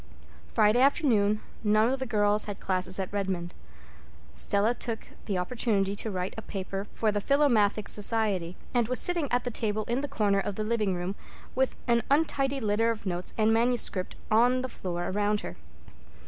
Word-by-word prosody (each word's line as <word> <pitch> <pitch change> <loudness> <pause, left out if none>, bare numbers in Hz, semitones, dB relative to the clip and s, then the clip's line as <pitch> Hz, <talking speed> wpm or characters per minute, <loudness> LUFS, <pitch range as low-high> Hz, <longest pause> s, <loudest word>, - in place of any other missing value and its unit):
Friday 210 - +3
afternoon 220 -7 +3 0.2
none 215 +1 +3
of 265 +2 -1
the 260 - -3
girls 210 -2 +2
had 205 -2 -6
classes 185 0 0
at 190 +1 -4
Redmond. 190 -4 -2 0.8
Stella 205 - +1
took 230 -2 -4 0.2
the 200 -4 -1
opportunity 200 0 0
to 220 - -2
write 185 -2 -3
a 225 - -6
paper 195 0 -5
for 220 -2 0
the 205 0 -2
Philomathic 220 -7 +2
Society, 205 -5 +1 0.2
and 240 -3 +2
was 255 +1 +2
sitting 340 -6 +2
at 245 0 +1
the 245 - -3
table 215 -1 -1
in 235 +5 -2
the 290 - -3
corner 205 -6 +1
of 200 0 -3
the 215 - -3
living 215 -4 0
room 175 +2 -3 0.4
with 265 0 0
an 235 -1 +3
untidy 275 -2 +1
litter 220 0 +1
of 225 -2 -3
notes 180 -1 -3
and 220 0 +3
manuscript 230 -5 +2 0.2
on 245 +4 +4
the 260 - -3
floor 175 -5 -4
around 205 +1 0
her. 90 - -7
215 Hz, 175 wpm, -28 LUFS, 195-240 Hz, 0.8 s, on